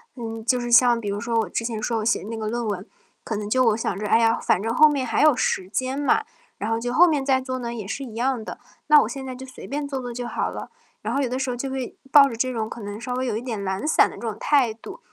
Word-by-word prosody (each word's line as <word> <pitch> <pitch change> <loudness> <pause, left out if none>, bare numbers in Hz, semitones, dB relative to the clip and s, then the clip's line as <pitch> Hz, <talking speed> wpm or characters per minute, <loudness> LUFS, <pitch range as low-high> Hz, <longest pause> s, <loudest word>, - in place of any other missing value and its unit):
嗯， 225 -2 -6
就 250 0 +2
是 240 0 -4
像 240 -1 +6
比 205 - -3
如 200 - -2
说 230 0 0
我 220 - -1
之 230 - -2
前 225 -3 -3
说 230 0 -1
我 215 - -4
写 235 - +2
那 225 +2 -6
个 215 - -3
论 240 +2 -2
文， 200 -2 -4 0.4
可 220 - -3
能 210 0 -4
就 255 +2 +3
我 225 - +4
想 225 - -2
着： 210 - -4
“哎 225 - +4
呀， 230 0 +3
反 185 - +1
正 225 +1 -1
后 310 +6 +7
面 280 -3 0
还 230 - +2
有 305 -4 +6
时 185 -6 0
间 260 +6 -2
嘛， 435 +9 +2 0.4
然 210 - -2
后 225 0 0
就 245 +1 -3
后 350 +6 +7
面 295 -5 0
再 265 -1 +2
做 255 0 -4
呢 235 -2 -4
也 215 -4 -6
是 275 +5 -4
一 235 - -9
样 240 -1 -1
的， - - -7 0.3
那 300 -1 +7
我 220 - -1
现 265 +2 -6
在 260 - -5
就 260 - -9
随 255 - -11
便 285 +1 -3
做 270 -2 -3
做 245 -1 -6
就 245 0 -4
好 - - -2
了。 - - -7 0.3
“然 225 +5 -3
后 - - +1
有 - - 0
的 255 +2 -3
时 265 -1 -1
候 245 - -2
就 265 +2 -4
会 265 -2 -5
抱 280 -2 +8
着 235 - -6
这 255 +3 -1
种 220 -2 -3
可 - - -8
能 205 +2 -7
稍 250 +1 -3
微 255 - -1
有 235 -4 -1
一 220 - -3
点 230 -5 -4
懒 190 +8 -2
散 - - +5
的 - - -10
这 - - -11
种 220 -3 -4
态 270 -6 +3
度， 225 - -11
240 Hz, 335 characters per minute, -23 LUFS, 225-260 Hz, 0.4 s, 抱